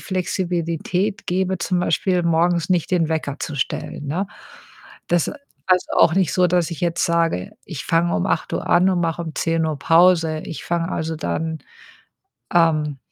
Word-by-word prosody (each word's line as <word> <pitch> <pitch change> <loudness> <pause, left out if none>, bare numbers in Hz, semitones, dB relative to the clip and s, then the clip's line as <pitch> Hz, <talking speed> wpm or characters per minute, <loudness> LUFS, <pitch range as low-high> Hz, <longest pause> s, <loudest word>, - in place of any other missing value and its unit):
Flexibilität 180 +2 -2
gebe, 185 +1 0
zum 180 +1 0
Beispiel 180 +2 +1
morgens 170 +1 +1
nicht 175 -3 +1
den 170 -4 +2
Wecker 155 -3 -2
zu 155 - -5
stellen, 145 +2 -3
ne? 180 +8 -1 0.8
Das 175 -2 +2 0.4
heißt 180 -1 +3
auch 160 - +5
nicht 190 -3 +2
so, 180 -1 +3
dass 175 -1 +1
ich 165 - -6
jetzt 170 -1 0
sage: 165 - 0
„Ich 160 -8 -7
fange 170 +1 +1
um 90 - 0
8:00 - - -2
an 180 +2 +4
und 180 -2 0
mache 165 0 -1
um 160 -2 -7
10:00 160 -2 0
Pause.“ 165 -1 +4
Ich 165 - -7
fange, 170 +1 -1
also, 160 0 -2
dann, 160 +1 -3 1.0
ähm 155 -4 +2
170 Hz, 160 wpm, -21 LUFS, 160-180 Hz, 1.0 s, auch